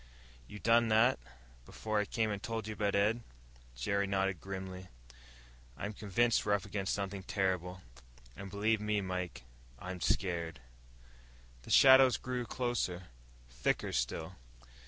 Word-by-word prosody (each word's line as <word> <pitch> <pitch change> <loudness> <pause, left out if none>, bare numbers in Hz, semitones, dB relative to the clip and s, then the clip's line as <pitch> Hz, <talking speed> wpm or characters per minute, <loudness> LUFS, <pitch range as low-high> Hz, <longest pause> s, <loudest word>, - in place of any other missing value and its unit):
"You 105 - -9
done 115 +2 +4
that, 110 +4 +4 0.4
before 110 - -2
I 105 - +1
came 110 0 -1
and 100 -1 -4
told 115 -1 -4
you 110 - -3
about 105 -1 0
Ed?" 105 +4 +2 0.5
Jerry 100 +12 0
nodded 95 -2 0
grimly. 95 -1 -6 0.9
"I'm 105 - -4
convinced 110 +4 +1
we're 105 - +1
up 100 - -4
against 100 -1 -2
something 100 -1 -4
terrible. 90 -2 -2 0.5
And 100 0 -8
believe 105 +2 +1
me, 105 0 0
Mike, 90 -9 -4 0.3
I'm 90 +5 -7
scared." 85 -3 -1 1.0
The - - -14
shadows 130 -1 +7
drew 125 -1 -4
closer, 110 -9 -2 0.4
thicker - - -1
still. 80 +9 -2
100 Hz, 135 wpm, -33 LUFS, 90-110 Hz, 1.0 s, shadows